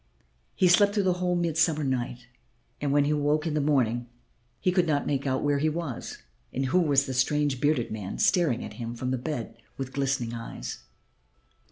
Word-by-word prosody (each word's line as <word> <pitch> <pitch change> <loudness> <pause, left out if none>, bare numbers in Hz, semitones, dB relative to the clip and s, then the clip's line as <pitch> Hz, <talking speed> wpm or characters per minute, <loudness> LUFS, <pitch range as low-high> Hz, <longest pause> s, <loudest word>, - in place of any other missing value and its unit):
He 185 - +4
slept 200 +4 +5
through 205 - +2
the 185 -1 +3
whole 180 0 +1
mild 170 -2 0
summer 160 -2 +3
night, 125 -2 -2 0.6
and 145 -1 0
when 145 0 +4
he 145 - +1
awoke 150 +1 +1
in 160 - -1
the 150 - +1
morning 120 -5 +1 0.5
he 180 - +2
could 180 -1 +2
not 145 -2 +1
make 140 -1 -1
out 130 0 0
where 145 -1 +2
he 155 +2 +2
was 155 -6 -5 0.3
and 135 +2 -1
who 145 +8 +3
was 140 -5 +3
the 130 - -4
strange 135 +1 +1
bearded 145 -5 +1
man 105 -3 -5
staring 160 -10 +2
at - - -8
him 115 +1 -4
from 125 +2 -3
the 130 - -1
bed 120 -5 -4 0.2
with 135 -1 -5
glistening 135 -4 -1
eyes. 115 - -7
140 Hz, 200 wpm, -27 LUFS, 125-155 Hz, 0.6 s, slept